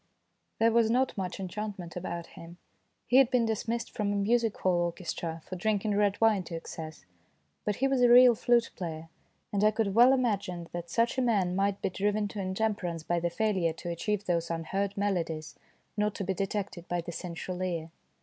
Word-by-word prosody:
There 230 Hz, +1 st, +4 dB
was 230 Hz, -1 st, +3 dB
not 255 Hz, +3 st, +1 dB
much 185 Hz, -3 st, -4 dB
enchantment 195 Hz, -2 st, -5 dB
about 170 Hz, -1 st, -4 dB
him 170 Hz, +1 st, -11 dB, 0.5 s
he 250 Hz, -, +3 dB
had 265 Hz, -3 st, +6 dB
been 250 Hz, -3 st, +2 dB
dismissed 225 Hz, +1 st, -2 dB
from 205 Hz, -2 st, -1 dB
a -, -, 0 dB
music 225 Hz, +2 st, +1 dB
hall 180 Hz, -2 st, +1 dB
orchestra 165 Hz, -1 st, -4 dB
for 185 Hz, -, -6 dB
drinking 210 Hz, +2 st, 0 dB
red 205 Hz, -1 st, +2 dB
wine 220 Hz, -3 st, +4 dB
to 170 Hz, -, -6 dB
excess 160 Hz, -, -8 dB, 0.6 s
but 210 Hz, -, 0 dB
he 270 Hz, -, +1 dB
was 270 Hz, -2 st, +1 dB
a 245 Hz, -, +6 dB
real 245 Hz, 0 st, +9 dB
flute 235 Hz, +1 st, +2 dB
player, 165 Hz, -3 st, -6 dB, 0.4 s
and 200 Hz, 0 st, +1 dB
I 215 Hz, -, +7 dB
could 215 Hz, -2 st, -1 dB
well 240 Hz, +4 st, +7 dB
imagine 200 Hz, -9 st, 0 dB
that 175 Hz, 0 st, -6 dB
such 235 Hz, +7 st, +1 dB
a -, -, +3 dB
man 200 Hz, -7 st, +1 dB
might 195 Hz, +1 st, 0 dB
be -, -, 0 dB
driven 205 Hz, +2 st, 0 dB
to 205 Hz, -, -7 dB
in 185 Hz, 0 st, -3 dB
temperance 190 Hz, -7 st, -1 dB
by 175 Hz, +1 st, 0 dB
the 175 Hz, +1 st, 0 dB
failure 185 Hz, -3 st, 0 dB
to 170 Hz, +2 st, -7 dB
achieve 205 Hz, +4 st, -2 dB
those 170 Hz, -2 st, 0 dB
11 165 Hz, -1 st, -2 dB
unheard 195 Hz, +4 st, -2 dB
melodies 165 Hz, -6 st, -2 dB, 0.2 s
" -, -, -41 dB
not 210 Hz, 0 st, 0 dB
to -, -, -3 dB
be 190 Hz, -, -1 dB
detected 195 Hz, -2 st, -3 dB
by 175 Hz, 0 st, -1 dB
the 170 Hz, -, -7 dB
sensual 180 Hz, +1 st, -5 dB
ear. 170 Hz, -3 st, -3 dB
195 Hz, 205 wpm, -29 LUFS, 175-220 Hz, 0.6 s, real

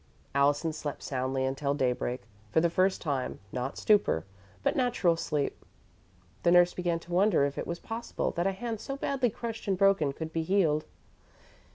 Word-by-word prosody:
Allison 145 Hz, +3 st, +2 dB
slept 150 Hz, -2 st, -5 dB
soundly 130 Hz, 0 st, -1 dB
until 140 Hz, +1 st, -1 dB
daybreak, 125 Hz, -3 st, -1 dB, 0.3 s
for 135 Hz, -, +3 dB
the 170 Hz, +1 st, +2 dB
first 185 Hz, +2 st, +2 dB
time 140 Hz, -5 st, -2 dB
not 125 Hz, +2 st, -3 dB
stupor, 200 Hz, -, +3 dB, 0.4 s
but -, -, +2 dB
natural 245 Hz, -10 st, +2 dB
sleep. 150 Hz, -3 st, -2 dB, 0.8 s
The -, -, +3 dB
nurse 175 Hz, 0 st, +6 dB
began 175 Hz, -2 st, 0 dB
to 175 Hz, -, -9 dB
wonder 180 Hz, -5 st, +4 dB
if 140 Hz, 0 st, -3 dB
it -, -, -4 dB
was 170 Hz, -, -3 dB
possible 230 Hz, +4 st, -3 dB
that 175 Hz, +2 st, 0 dB
a -, -, +2 dB
hand 225 Hz, +2 st, -4 dB
so 275 Hz, 0 st, -4 dB
badly 265 Hz, -3 st, +1 dB
crushed 225 Hz, 0 st, -6 dB
and 195 Hz, -2 st, +1 dB
broken 190 Hz, -7 st, +4 dB
could 160 Hz, +3 st, -6 dB
be 165 Hz, -, 0 dB
healed. 160 Hz, -4 st, +2 dB
165 Hz, 175 wpm, -29 LUFS, 140-195 Hz, 0.8 s, nurse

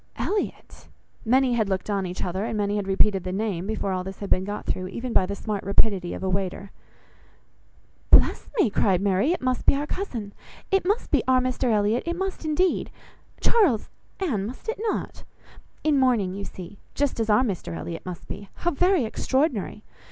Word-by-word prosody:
"Elliot!" 415 Hz, 0 st, -3 dB, 0.4 s
Many 255 Hz, +2 st, +4 dB
had 220 Hz, -4 st, +1 dB
looked 190 Hz, -1 st, -1 dB
on 200 Hz, -3 st, 0 dB
each 180 Hz, -, -5 dB
other, 185 Hz, +2 st, -2 dB
and 220 Hz, -, -2 dB
many 205 Hz, 0 st, 0 dB
had 200 Hz, -2 st, -2 dB
repeated 195 Hz, 0 st, +3 dB
the 185 Hz, -, -3 dB
name, 195 Hz, -2 st, -2 dB
before 215 Hz, -2 st, -2 dB
all 185 Hz, -1 st, -1 dB
this 190 Hz, +1 st, -7 dB
had 200 Hz, -, -7 dB
been 185 Hz, -, +3 dB
got 205 Hz, +2 st, -5 dB
through, 185 Hz, 0 st, -2 dB
even 235 Hz, +5 st, -5 dB
by 185 Hz, -, +4 dB
the 200 Hz, -, -3 dB
smart 210 Hz, 0 st, -3 dB
rapidity 195 Hz, -2 st, +1 dB
of -, -, -7 dB
a -, -, 0 dB
waiter. 195 Hz, +1 st, -2 dB, 1.4 s
"Bless -, -, +5 dB
me!" 230 Hz, -, +4 dB
cried 190 Hz, -3 st, +3 dB
Mary; 200 Hz, -, +2 dB
"it 355 Hz, -, -2 dB
must 255 Hz, -1 st, -1 dB
be -, -, +6 dB
our 285 Hz, +1 st, -1 dB
cousin; 240 Hz, -, -4 dB, 0.4 s
it 385 Hz, -2 st, +2 dB
must 415 Hz, +4 st, 0 dB
be -, -, +4 dB
our 260 Hz, 0 st, +5 dB
Mr 255 Hz, -1 st, 0 dB
Elliot, 215 Hz, +2 st, +2 dB
it 340 Hz, -, 0 dB
must, 385 Hz, 0 st, -3 dB
indeed! 330 Hz, +4 st, +1 dB, 0.5 s
Charles, 355 Hz, -, +3 dB, 0.3 s
Anne, 230 Hz, -, -1 dB
must 255 Hz, -, -9 dB, 0.2 s
not -, -, -3 dB
it? -, -, -16 dB, 0.6 s
In 300 Hz, -3 st, +3 dB
mourning, 235 Hz, -8 st, +2 dB
you 200 Hz, +1 st, -5 dB
see, 185 Hz, +2 st, -10 dB, 0.2 s
just 285 Hz, -4 st, 0 dB
as 225 Hz, -1 st, 0 dB
our 210 Hz, +4 st, +5 dB
Mr 180 Hz, -, -3 dB
Elliot 165 Hz, -, -6 dB
must 180 Hz, -2 st, -7 dB
be. 200 Hz, -1 st, -7 dB
How 345 Hz, -, 0 dB
very 355 Hz, -2 st, +3 dB
extraordinary! 250 Hz, -, -1 dB
210 Hz, 195 wpm, -25 LUFS, 195-260 Hz, 1.4 s, be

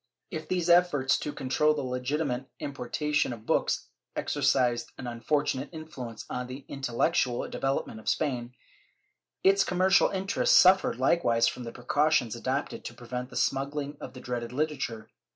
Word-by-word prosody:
^ -, -, -59 dB, 0.3 s
If 160 Hz, 0 st, -5 dB
these 180 Hz, -2 st, 0 dB
efforts 170 Hz, -6 st, +4 dB
to 150 Hz, -, -3 dB
control 150 Hz, +3 st, +1 dB
the 145 Hz, -, -2 dB
legitimate 130 Hz, +1 st, -2 dB
importation 145 Hz, +2 st, -1 dB
of 110 Hz, -2 st, -11 dB
books -, -, +1 dB, 0.3 s
exercised 120 Hz, -2 st, +1 dB
an 130 Hz, -, -7 dB
unfortunate 135 Hz, +3 st, -1 dB
influence 135 Hz, -8 st, -8 dB
on 125 Hz, 0 st, -4 dB
the 130 Hz, +2 st, -8 dB
intellectual 130 Hz, -1 st, 0 dB
develop 135 Hz, 0 st, -1 dB
ment 110 Hz, -, -9 dB
of -, -, -3 dB
Spain, 125 Hz, -5 st, -1 dB, 0.9 s
its 195 Hz, +1 st, +5 dB
commercial 185 Hz, +1 st, +4 dB
interests 195 Hz, +3 st, +2 dB
suffered 185 Hz, -7 st, +5 dB
likewise 125 Hz, -4 st, +3 dB
from 125 Hz, -, -3 dB
the 115 Hz, -, -5 dB
precautions 145 Hz, -1 st, +1 dB
adopted 130 Hz, +4 st, -3 dB
to -, -, -6 dB
prevent 125 Hz, +1 st, -5 dB
the 125 Hz, -, -12 dB
smuggUng 140 Hz, +2 st, -1 dB
of -, -, -7 dB
the 125 Hz, -, -9 dB
dreaded 120 Hz, -1 st, -4 dB
literature. 130 Hz, -6 st, -2 dB
135 Hz, 150 wpm, -28 LUFS, 125-155 Hz, 0.9 s, its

